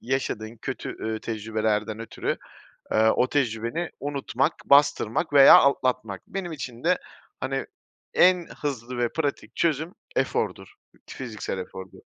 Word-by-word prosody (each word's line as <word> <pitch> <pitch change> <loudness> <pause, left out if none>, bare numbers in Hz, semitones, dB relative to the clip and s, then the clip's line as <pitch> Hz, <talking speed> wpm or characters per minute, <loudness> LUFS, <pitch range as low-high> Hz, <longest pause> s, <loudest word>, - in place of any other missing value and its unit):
yaşadığın 120 -3 -3
kötü, 130 -4 -5
eee, 110 0 -3
tecrübelerden 110 -1 -1
ötürü, 115 - -3 0.5
eee, 110 +1 +4
o 125 - +3
tecrübeni 125 +4 -1
unutmak, 140 -2 0
bastırmak 145 0 +3
veya 140 -1 +10
atlatmak. 125 -7 +1
Benim 185 -3 -4
için 130 -3 -7
de, 180 +1 +3 0.4
hani, 135 +1 -2 0.5
en 180 -1 +5 0.2
hızlı 125 -3 -3
ve 120 -1 +2
pratik 145 -3 -3
çözüm 160 +1 0 0.2
efordur, - - -1 0.3
t - - -9
fiziksel 110 -6 -5
efordur. 95 +1 -8
130 Hz, 125 wpm, -25 LUFS, 110-145 Hz, 0.5 s, veya